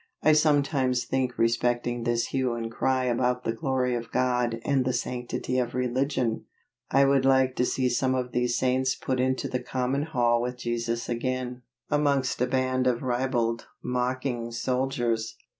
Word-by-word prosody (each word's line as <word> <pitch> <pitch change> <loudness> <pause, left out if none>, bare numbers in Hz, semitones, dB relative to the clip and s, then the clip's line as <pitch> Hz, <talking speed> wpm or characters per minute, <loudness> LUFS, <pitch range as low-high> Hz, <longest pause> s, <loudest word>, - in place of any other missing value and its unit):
I 155 - +6
sometimes 140 -4 +2
think 130 -2 -1
respecting 120 +1 0
this 120 -1 0
hue 130 -3 0
and 115 -1 -4
cry 130 +2 +1
about 125 0 0
the 115 - -1
glory 125 +1 0
of 120 -1 -4
God 125 -2 +1
and 140 -2 +2
the 130 0 0
sanctity 125 +1 -2
of 120 -1 -2
religion, 125 -2 0 0.4
I 140 0 +4
would 135 -1 +3
like 130 -1 +3
to 125 - +2
see 130 0 0
some 130 +1 +1
of 125 -1 -2
these 120 0 0
saints 130 0 +1
put 130 -1 -2
into 130 0 0
the 125 - -2
common 130 +2 -1
hall 120 -6 +1
with 125 +1 -3
Jesus 115 -1 -2
again, 125 +1 -3 0.3
amongst 140 -4 +1
a 125 - +3
band 130 0 +1
of 125 0 +1
ribald, 120 -2 0 0.2
mocking, 125 -1 -2
soldiers. 120 -2 -1
125 Hz, 160 wpm, -27 LUFS, 120-130 Hz, 0.4 s, I